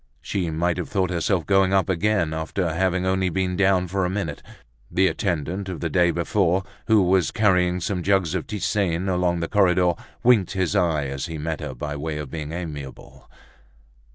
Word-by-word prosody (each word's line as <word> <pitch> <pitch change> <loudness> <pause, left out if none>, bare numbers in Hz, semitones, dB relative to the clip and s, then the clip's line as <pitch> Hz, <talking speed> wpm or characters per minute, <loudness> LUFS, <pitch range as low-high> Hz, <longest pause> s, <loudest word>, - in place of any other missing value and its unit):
She 90 -4 -2
might 85 +2 0
have 90 - -4
thought 95 -3 0
herself 85 0 0
going 95 -1 +3
up 95 -1 +3
again 95 -2 +1
after 80 +2 -2
having 95 +1 0
only 95 0 +1
been 90 +1 -1
down 95 -1 +2
for 95 +2 -1
a 90 - 0
minute. 90 -6 -3 0.5
The 95 - +2
attendant 95 0 -1
of 90 - -5
the 85 -2 -3
day 90 +2 +3
before, 90 +2 +1 0.2
who 110 -3 +5
was 95 0 +3
carrying 90 -4 +2
some 90 +1 -2
jugs 95 -3 +1
of - - -3
tisane 95 -3 -1
along 90 -2 +1
the 85 - -1
corridor, 90 -3 +3 0.3
winked 120 -7 +4
his 95 -3 -1
eye 80 -4 +2
as 70 +4 -4
he 80 -2 -5
met 80 +1 -3
her, 65 - -5
by 75 +4 -4
way 75 +1 -4
of 75 -3 -6
being 75 -2 -5
amiable. 75 -6 -8
90 Hz, 185 wpm, -23 LUFS, 80-95 Hz, 0.5 s, who